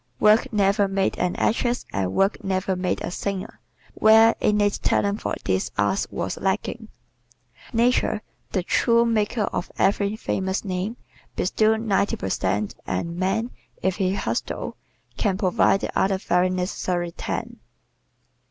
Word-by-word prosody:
Work 215 +5 +4
never 200 -1 +3
made 195 0 0
an 180 -1 0
actress 240 +2 0
and 95 -2 -1
work 195 - +1
never 190 0 0
made 180 0 -1
a - - -3
singer 195 +1 -4 0.3
where 220 +1 +6
innate 205 -1 +2
talent 200 +1 +1
for - - -2
these 95 0 0
arts 100 -1 +1
was 90 +2 -3
lacking. 210 +3 -2 0.8
Nature, 235 -2 +2 0.3
the 185 - 0
true 235 +5 +3
maker 220 -1 +1
of 180 - -3
every 200 +1 +2
famous 190 -2 -2
name, 190 +5 -3 0.4
bestows 220 +4 +2
ninety 200 -2 +1
per 95 - -4
cent 100 +2 -1
and 170 0 -2
man, 195 +6 -1 0.3
if 190 -1 +1
he 190 -1 +1
hustles, - - -3 0.4
can 195 -4 0
provide 195 0 +3
the - - -3
other 190 0 +2
very 180 -1 +1
necessary 180 -1 -2
ten. - - -5
195 Hz, 140 wpm, -24 LUFS, 180-215 Hz, 0.8 s, where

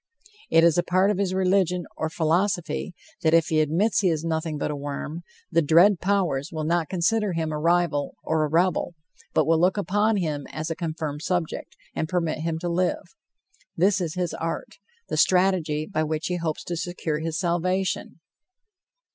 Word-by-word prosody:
It 165 - +5
is 170 0 +5
a - - +2
part 185 +3 +3
of 200 - -2
his 195 -2 0
religion 185 -1 +1
or 160 - -2
philosophy 170 0 0 0.3
that 160 0 +4
if 165 0 +3
he 155 - +2
admits 165 +10 +2
he 195 -3 +3
is 160 -2 -1
nothing 160 -1 -2
but 145 - -2
a - - -3
worm, 145 +3 -5 0.3
the 165 0 +4
dread 170 +5 +5
powers 180 -8 0
will 155 -1 -3
not 165 0 0
consider 205 +2 +1
him 160 -1 -2
a 150 - -3
rival 165 -3 +1
or 160 -1 +1
a - - +1
rebel, 175 +2 +1 0.4
but - - +4
will 160 0 +3
look 185 +3 +3
upon 205 +2 +1
him 150 -6 -2
as 155 +1 -4
a - - -2
confirmed 155 -3 -4
subject, 175 -2 -3 0.2
and 160 - -2
permit 165 -4 -1
him 160 0 -2
to 175 - -2
live. 175 +1 -1 0.6
This 190 +3 +3
is 165 -3 -3
his 180 -2 -2
art, 165 - -5 0.3
the - - -3
strategy 180 -5 +2
by 155 - -2
which 155 0 -2
he 180 - -1
hopes 165 -3 -3
to 175 - -4
secure 165 -2 -3
his 160 0 -3
salvation. 185 -1 -1
170 Hz, 185 wpm, -25 LUFS, 155-185 Hz, 0.6 s, It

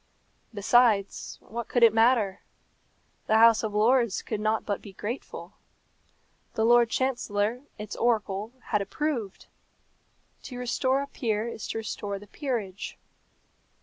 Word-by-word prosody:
Besides, 220 -1 +2
what 235 +1 -6
could 245 - +2
it 225 -2 +7
matter? 225 -4 +3 0.9
The 220 - +4
House 225 0 +6
of 215 -2 -3
Lords 235 0 +3
could 215 - -3
not 215 +1 0
but 205 -2 -2
be 200 - -11
grateful. 225 +7 -6 1.0
The 220 - +2
Lord 240 0 +5
Chancellor, 240 -3 -1 0.2
its 210 0 -6
oracle, 215 -2 0 0.2
had 210 -2 +2
approved. 230 -1 -3 1.0
To 250 - -8
restore 260 +2 0
a - - -7
peer 225 -5 -2
is 235 - -6
to - - -4
restore 205 -2 -4
the 205 - -12
peerage. 210 -5 -4
225 Hz, 130 wpm, -27 LUFS, 205-240 Hz, 1.0 s, it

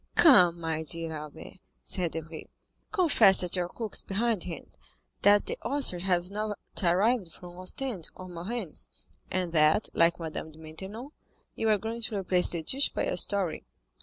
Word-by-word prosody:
"Come, 180 - +6
my 160 -1 -2
dear 165 0 -4
Albert," 150 +4 -10 0.2
said 175 -3 0
Debray, 160 0 -7 0.5
"confess 330 - +5
that 180 0 +1
your 175 -1 -1
cook 220 0 -6
is - - +3
behindhand, 200 -4 -3 0.5
that 205 0 +5
the - - -3
oysters 245 -9 0
have 180 0 0
not 210 0 -3 0.2
arrived 190 +2 +2
from 175 +2 -12
Ostend 190 -1 -3
or 185 - -10
Marennes, 180 +1 -5 0.4
and 180 -2 -2
that, 155 +6 +3
like 170 +1 +3
Madame 160 -1 -6
de - - -17
Maintenon, 190 - -8 0.4
you 225 - -1
are 215 - +4
going 225 +3 -5
to 220 -2 -2
replace 180 -2 +4
the 170 -2 -3
dish 270 - +2
by - - -3
a - - -1
story. 195 -6 0
185 Hz, 165 wpm, -28 LUFS, 165-215 Hz, 0.5 s, Come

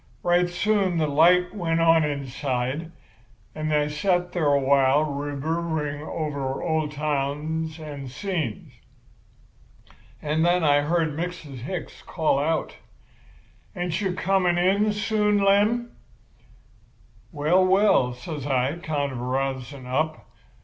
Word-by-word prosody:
Right 175 0 +3
soon 190 0 +1
the 160 - +2
light 175 +5 +4
went 165 -5 -1
out 165 -1 +5
inside; 140 +1 -3 0.6
and 155 0 -3
I 150 -1 +2
sat 175 +4 0
there 160 -5 +1
a 140 - +4
while 140 +1 +3
reverberating 150 +1 -3
over 145 -4 -3
old 160 -2 0
times 150 +2 -2
and 145 -4 -7
scenes. 160 - -4 1.5
And 155 +2 0
then 175 0 +3
I 145 -1 +4
heard 160 +2 +1
Mrs. 165 -5 -5
Hicks 165 +8 -6
call 155 -4 0
out, 160 +2 -1 1.0
'Ain't 175 +1 -2
you 190 -3 -1
coming 185 -2 +1
in 200 +4 +2
soon, 210 0 +1
Lem?' 205 +4 +2 1.4
"'Well, 160 +5 +2
well!' 185 -9 +3
says 145 +3 -6
I, 135 +3 0
kind 145 -4 -2
of 125 - -6
rousing 130 +1 -3
up. 155 +5 -2
155 Hz, 120 wpm, -24 LUFS, 140-180 Hz, 1.5 s, out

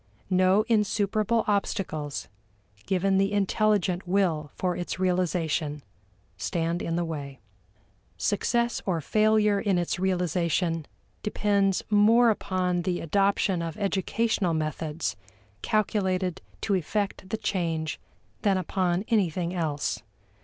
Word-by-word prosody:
No 185 +3 +4
insuperable 215 0 +1
obstacles, 170 -7 -1 0.6
given 195 +1 +2
the 195 +1 +2
intelligent 200 -2 +1
will 175 -6 +1
for 180 -1 -1
its 175 - -4
realization, 170 -5 0 0.5
stand 165 - -1
in 165 - -2
the 175 0 0
way. 140 -4 -6 0.8
Success 235 +3 0
or 175 -3 +1
failure 215 +4 +3
in 195 -2 +1
its 175 0 -1
realization 175 -3 0 0.3
depends 200 -2 +1
more 225 +3 +6
upon 185 -3 -1
the 175 0 -1
adoption 195 +1 +1
of 165 -1 -4
educational 200 -2 0
methods 155 0 -2 0.5
calculated 190 -4 0 0.2
to 205 - 0
effect 195 +1 -2
the 220 - -1
change 165 -7 -2 0.4
than 195 -2 +3
upon 185 +1 0
anything 180 -5 +1
else. 155 -5 -2
185 Hz, 110 wpm, -27 LUFS, 170-205 Hz, 0.8 s, more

